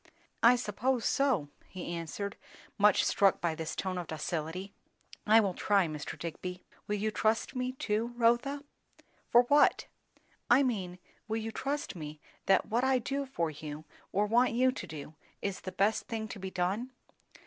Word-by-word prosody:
"I 240 +2 +7
suppose 245 +2 -1
so," 255 - +2 0.2
he 175 -2 -6
answered, 170 +4 -4 0.4
much 205 -1 +5
struck 195 -1 +3
by 170 -2 0
this 160 0 -4
tone 185 -1 -2
of 175 - -5
docility. 165 +4 -4 0.5
"I 220 +2 +8
will 200 -4 +1
try, 200 0 +2
Mr. 155 -2 -5
Digby." 180 +2 -6 0.2
"Will 210 - 0
you 215 +1 -1
trust 220 +3 0
me 255 0 -1
too, 225 -3 -1
Rotha?" 240 +5 +2 0.7
"For 240 0 +7
what?" 290 +4 +4 0.6
"I 255 +4 +6
mean, 190 -8 -2 0.3
will 220 0 -1
you 225 0 -3
trust 280 -1 -3
me 155 -2 -7 0.3
that 195 - +4
what 235 +3 0
I 265 0 +4
do 275 +3 -2
for 170 -11 -1
you, 150 +1 -8 0.3
or 205 +2 +2
want 235 +3 +3
you 255 +2 +4
to 255 - -7
do, 155 -1 -8 0.3
is 200 -2 -3
the 185 - -5
best 205 +4 +1
thing 220 -1 -3
to 205 - -7
be 190 0 -4
done?" 195 +8 -2
210 Hz, 170 wpm, -31 LUFS, 180-240 Hz, 0.7 s, I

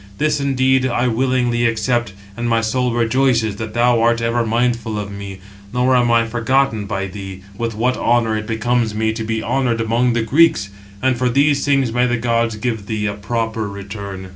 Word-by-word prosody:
This, 150 0 +1
indeed, 130 -1 +2
I 125 0 0
willingly 120 -1 +1
accept, 115 -1 -1 0.2
and 120 +1 -2
my 115 0 +3
soul 125 +3 0
rejoices 115 -2 +1
that 110 0 -6
thou 120 -1 +3
art 115 0 +3
ever 115 +1 0
mindful 115 -1 0
of 100 -1 -5
me; 100 -1 -7 0.3
nor 125 +2 +2
am 120 -1 +3
I 115 0 +3
forgotten 120 -1 0
by 100 -1 -2
thee, 95 -1 -8
with 115 +1 -3
what 125 +4 0
honour 115 -2 +1
it 110 0 -4
becomes 115 -1 0
me 110 0 0
to 110 0 -4
be 110 0 -2
honoured 125 -4 0
among 115 +2 +1
the 120 -1 0
Greeks. 145 -3 +3 0.3
And 130 -2 +1
for 125 -1 +2
these 140 +2 +2
things 135 -5 +1
may 125 +1 +2
the 120 0 0
gods 115 -1 0
give 110 -2 -3
thee 110 -1 -2
a 105 - -1
proper 110 +1 -3
return." 100 -1 -7
115 Hz, 190 wpm, -19 LUFS, 110-125 Hz, 0.3 s, my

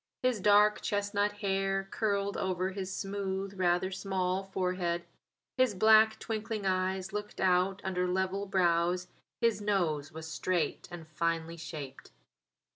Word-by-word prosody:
His 255 -4 +2
dark 210 +1 +5
chestnut 205 0 0
hair 195 -1 -1
curled 200 -2 0
over 185 0 -1
his 190 -1 -5
smooth, 195 0 -3
rather 180 +1 +2
small 190 0 -1
forehead. 180 -2 -1 0.5
His 255 -5 +3
black 220 +2 +6
twinkling 215 -2 -4
eyes 185 0 0
looked 210 0 -5
out 185 +1 +2
under 180 -1 0
level 190 +2 -1
brows; 180 -1 +1 0.3
his 230 -3 +2
nose 170 -9 0
was 160 0 -8
straight 165 0 -1
and 170 -2 -9
finely 165 +1 -2
shaped. 155 -4 -8
190 Hz, 125 wpm, -31 LUFS, 180-205 Hz, 0.5 s, black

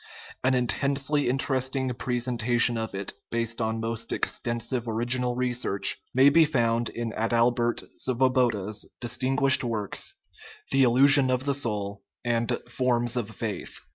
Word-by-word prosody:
An 130 0 +3
intensely 140 +3 0
interesting 130 0 -1
presentation 120 -1 +1
of 110 -2 -4
it, 100 0 -4 0.2
based 115 0 -2
on 110 0 -1
most 115 0 -4
extensive 120 +1 -2
original 120 +2 0
research, 120 -6 -1
may 130 +2 +6
be 165 +3 +6
found 120 -6 +1
in 115 -1 -4
Adalbert 120 +1 +1 0.2
Svoboda's 120 -5 +1
distinguished 130 +3 +2
works, 110 -4 -3 0.6
The 135 - +3
Illusion 135 +2 +5
of 130 +1 0
the 140 - +1
Soul 105 -7 -2 0.2
and 115 -1 0
Forms 120 -1 0
of 120 -4 -2
Faith. 110 -1 -5
120 Hz, 125 wpm, -26 LUFS, 115-130 Hz, 0.6 s, may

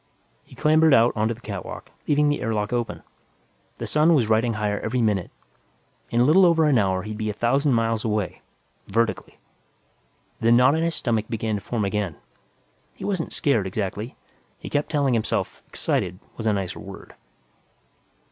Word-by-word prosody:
He - - -17
clambered 155 -1 +4
out 115 0 +4
onto 110 +1 0
the 120 - -18
catwalk, - - -7 0.2
leaving 150 0 +3
the 145 - 0
air 115 -1 -1
lock 105 +2 -2
open. 120 -1 -2 0.7
The - - -5
sun 155 +2 +4
was 120 -7 +2
riding 115 +2 +2
higher 105 -1 -1
every 120 +3 -2
minute. 105 -6 +1 0.8
In 120 - 0
a - - +6
little 160 +9 +5
over 165 -3 +4
an 140 -6 +4
hour, 95 -2 0
he'd 105 +1 -6
be 110 0 -1
a - - -2
thousand 135 +6 +1
miles 115 -1 0
away 105 -5 -2 0.5
vertically. 115 0 -1 1.0
The 115 +1 +3
knot 125 +3 +6
in 160 +1 0
his 165 -1 0
stomach 115 -3 -1
began 110 -1 -2
to 105 - -2
form 110 +1 -2
again. 100 -4 -2 0.8
He - - -8
wasn't 185 -5 -2
scared, 115 -9 +1
exactly; 105 +4 -4 0.4
he - - -9
kept 145 0 0
telling 140 -4 +1
himself 115 -2 -1
"excited" 90 0 -1 0.2
was 110 - -4
a 110 - +3
nicer 95 -3 -3
word. - - -11
115 Hz, 175 wpm, -24 LUFS, 105-140 Hz, 1.0 s, a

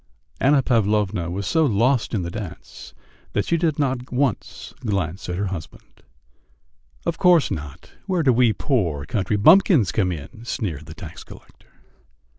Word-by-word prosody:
Anna 135 0 +4
Pavlovna 105 -7 +1
was 95 +3 -4
so 160 -1 +2
lost 120 -1 +1
in 95 - -1
the 85 - -5
dance 100 -2 -9 0.4
that 105 - 0
she 170 - +1
did 165 -3 0
not 130 -4 -2
once 125 -2 -2
glance 95 -5 -3
at 90 - -2
her 100 +1 -2
husband. 85 -4 -9 1.0
"Of 170 -1 -2
course 180 -4 +4
not! 75 -3 -7 0.2
Where 185 -4 +1
do 130 -3 +4
we 120 -1 +4
poor 90 - -1
country 105 +3 -1
bumpkins 155 - +5
come 95 -4 +1
in!" 90 - -8
sneered 90 - -4
the 80 - -10
tax 80 -2 -9
collector. - - -17
110 Hz, 155 wpm, -22 LUFS, 90-135 Hz, 1.0 s, bumpkins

